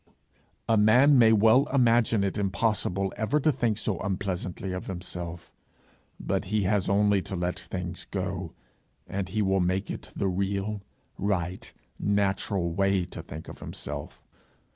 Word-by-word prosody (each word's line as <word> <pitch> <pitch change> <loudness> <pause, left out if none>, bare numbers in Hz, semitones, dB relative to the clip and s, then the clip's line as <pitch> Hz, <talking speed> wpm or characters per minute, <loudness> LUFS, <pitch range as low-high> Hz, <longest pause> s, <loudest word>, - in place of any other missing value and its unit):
A 115 - +4
man 125 +7 +6
may 115 -2 +7
well 110 +5 +5
imagine 115 -5 +3
it 95 - -1
impossible 100 -1 0
ever 125 +7 +1
to 155 +2 +3
think 115 -6 0
so 95 -6 -2
unpleasantly 95 -1 -3
of 90 0 -5
himself! 90 -2 -6 0.7
But 95 +1 -1
he 105 +2 0
has 95 -1 +1
only 100 0 +3
to 95 - -6
let 90 +1 -2
things 90 -1 -6
go, 95 -3 -3 0.5
and 95 -2 -4
he 105 +2 0
will 95 0 +2
make 95 +2 0
it - - -7
the 100 - 0
real, 100 +2 -1 0.4
right, 95 -2 -2 0.3
natural 100 -3 0
way 95 0 +2
to - - -8
think 80 +2 -9
of - - -10
himself. - - -7
100 Hz, 145 wpm, -27 LUFS, 95-105 Hz, 0.7 s, may